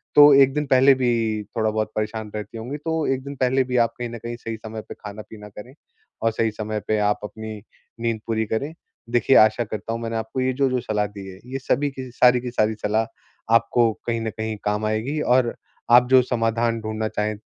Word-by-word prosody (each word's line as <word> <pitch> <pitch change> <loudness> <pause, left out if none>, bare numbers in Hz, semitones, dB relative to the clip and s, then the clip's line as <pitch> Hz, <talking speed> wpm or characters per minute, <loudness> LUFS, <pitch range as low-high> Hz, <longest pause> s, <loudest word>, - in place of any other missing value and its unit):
तो 145 0 +9
1 135 0 +1
दिन 150 +1 -1
पहले 135 +1 +6
भी 115 -4 0
थोड़ा 110 -1 +2
बहुत 110 0 -2
परेशान 110 0 -3
रहती 105 +1 -6
होंगी, 125 +6 -5
तो 160 +1 -2
1 130 0 -4
दिन 140 +1 -7
पहले 130 0 +2
भी 125 0 -1
आप 115 - -3
कहीं 120 -1 -3
न 120 - -7
कहीं 120 +1 -6
सही 115 -1 -6
समय 110 0 -7
पे - - -5
खाना-पीना 105 0 -10
करें, 105 +5 -11 0.5
और 115 - +2
सही 110 0 0
समय 110 0 -4
पे 110 - +1
आप 105 0 +1
अपनी 110 0 -8 0.4
नींद 115 -1 -1
पूरी 110 -1 0
करें। 135 +9 -3 0.4
देखिए 120 +2 +3
आशा 110 +2 +5
करता 110 0 -5
हूँ 115 - -4
मैंने 115 0 -3
आपको 110 +4 -3
ये 130 0 +1
जो 135 +1 +1
जो 125 -1 0
सलाह 105 -2 -1
दी 100 -1 -10
है 95 0 -11
ये 135 - -2
सभी 145 +2 0
की 130 -1 -8
सारी 125 0 +4
की 125 0 -5
सारी 110 -2 +1
सलाह 110 +2 +1 0.5
आपको 115 0 +3 0.2
कहीं 115 -1 -1
न 110 - -2
कहीं 110 0 -4
काम 105 +1 0
आएगी, 110 +8 -1
और 125 -3 +2 0.4
आप 120 +1 +7
जो 130 -1 +7
समाधान 115 -1 0
ढूँढना 110 0 -3
चाहे 105 0 -2
115 Hz, 220 wpm, -23 LUFS, 110-125 Hz, 0.5 s, तो